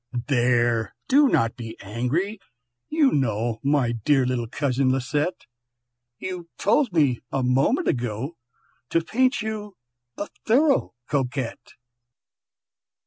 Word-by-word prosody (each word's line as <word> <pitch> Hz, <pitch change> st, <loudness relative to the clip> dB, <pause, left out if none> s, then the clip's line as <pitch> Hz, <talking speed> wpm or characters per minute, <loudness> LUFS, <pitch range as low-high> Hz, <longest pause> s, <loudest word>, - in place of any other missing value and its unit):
"There, 120 Hz, -3 st, +2 dB
do 285 Hz, +2 st, +5 dB
not 115 Hz, -, +2 dB
be 115 Hz, -2 st, -8 dB
angry! 125 Hz, -, -2 dB, 0.5 s
you 305 Hz, -3 st, +3 dB
know, 115 Hz, -4 st, 0 dB
My 140 Hz, -4 st, +2 dB
dear 130 Hz, +4 st, +2 dB
little 125 Hz, -2 st, -1 dB
cousin 130 Hz, +1 st, +1 dB
Lisette, 145 Hz, +6 st, -1 dB, 0.7 s
You 180 Hz, +1 st, -6 dB
told 245 Hz, +3 st, +2 dB
me 145 Hz, -8 st, +2 dB
a 135 Hz, -, 0 dB
moment 135 Hz, -, +2 dB
ago 125 Hz, +5 st, -2 dB, 0.5 s
To 165 Hz, -, +1 dB
paint 255 Hz, +6 st, +1 dB
you 210 Hz, -3 st, -5 dB, 0.4 s
a 205 Hz, -, -3 dB, 0.2 s
thorough 270 Hz, -, +3 dB
Coquette!" 135 Hz, -3 st, -3 dB
135 Hz, 110 wpm, -24 LUFS, 120-200 Hz, 0.7 s, do